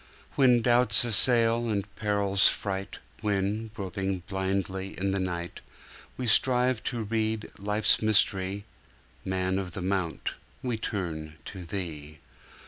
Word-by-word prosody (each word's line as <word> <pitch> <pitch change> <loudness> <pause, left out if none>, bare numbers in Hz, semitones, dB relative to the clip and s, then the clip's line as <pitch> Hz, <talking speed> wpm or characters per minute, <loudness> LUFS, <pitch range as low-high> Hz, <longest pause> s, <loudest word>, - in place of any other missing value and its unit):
When 125 -4 +3
doubts 120 -3 +7
assail, 115 0 +5
and 100 -2 -2
perils 100 -2 +2
fright, 95 -1 -5 0.2
When, 105 +1 -2
groping 95 -1 -4
blindly 95 0 -3
in 95 +1 -1
the 100 - -2
night, 90 -2 -5 0.6
We 130 - -4
strive 125 +1 +2
to 120 -3 -3
read 110 0 -2
life's 105 +2 +2
mystery, 100 -2 0 0.6
Man 95 0 -2
of 90 -3 -6
the 95 - -6
Mount, 95 -3 -3 0.3
We 125 -2 -2
turn 80 -8 -5
to 95 -2 -9
Thee! 80 -5 -6
100 Hz, 125 wpm, -27 LUFS, 95-110 Hz, 0.6 s, doubts